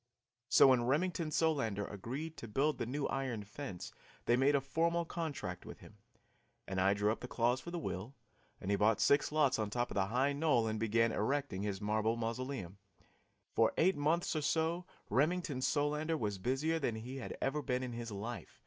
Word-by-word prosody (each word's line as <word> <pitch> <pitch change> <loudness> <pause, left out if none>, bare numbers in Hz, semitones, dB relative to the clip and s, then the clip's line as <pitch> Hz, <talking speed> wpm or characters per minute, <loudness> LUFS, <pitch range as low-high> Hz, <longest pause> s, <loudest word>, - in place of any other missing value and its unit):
So 135 - +7
when 125 -2 +4
Remington 165 +3 +1
Solander 140 -11 +1
agreed 135 +11 -5
to 115 - -7
build 140 +8 +1
the - - -2
new 140 +3 -2
iron 130 -6 -2
fence 105 -2 -7 0.3
they 120 - +4
made 135 +3 +4
a - - +4
formal 165 +5 0
contract 150 - -4
with - - -9
him, 105 - -15 0.7
and 95 -1 -1
I 100 +1 +4
drew 105 +1 +2
up 110 - -3
the 125 - -6
clause 125 +1 +1
for 170 - -8
the 175 - -4
will, 115 - -4 0.4
and 95 - -3
he 100 - +3
bought 105 +2 +3
six 140 +1 +3
lots 150 -5 +3
on 105 -1 -1
top 120 +3 -1
of - - -5
the 95 -1 +2
high 130 +6 +1
knoll 140 -6 +2
and 110 -1 -1
began 115 +1 +2
erecting 135 -3 -1
his 100 -1 -3
marble 110 +2 +1
mausoleum. 115 -4 -4 0.7
For 115 - +3
eight 185 +2 +4
months 155 +4 +1
or 155 - 0
so 165 +4 0 0.2
Remington 150 - +1
Solander 150 +3 +1
was 105 -6 -2
busier 140 +9 0
than 120 -6 -1
he 125 +5 -6
had 135 - -6
ever 140 +3 0
been 125 -1 -1
in 125 -2 -4
his 115 -1 -5
life. 110 +4 -6
130 Hz, 195 wpm, -35 LUFS, 110-150 Hz, 0.7 s, So